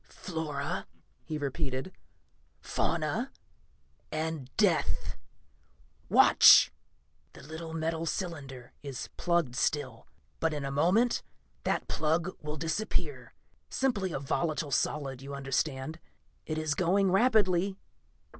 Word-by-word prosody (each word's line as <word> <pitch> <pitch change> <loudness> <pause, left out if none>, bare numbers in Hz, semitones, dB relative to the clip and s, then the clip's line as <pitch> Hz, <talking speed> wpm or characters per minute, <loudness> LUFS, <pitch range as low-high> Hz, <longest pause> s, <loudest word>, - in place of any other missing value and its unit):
"Flora," 155 -5 -4 0.4
he 155 - -3
repeated. 140 +2 -3 0.7
"Fauna. - - -1 0.8
And 155 -4 -3
death. - - +1 0.9
Watch! - - +8 0.6
The - - -13
little 160 +2 -7
metal 165 +1 -1
cylinder 140 -9 -5
is 140 -3 -6
plugged 170 -8 +1
still, 130 -4 -1 0.3
but 160 -2 +1
in 145 -2 -3
a 135 - -3
moment 185 - +3 0.4
that - - 0
plug 165 +4 0
will 150 0 -4
disappear 165 +8 -3 0.3
simply 205 -9 0
a - - -2
volatile 145 +2 -1
solid, 135 -1 -1
you 140 +1 -6
understand. 135 +2 -2 0.5
It 155 - -2
is 155 -2 0
going 185 +3 +2
rapidly 195 -3 +3
155 Hz, 105 wpm, -30 LUFS, 140-175 Hz, 0.9 s, Watch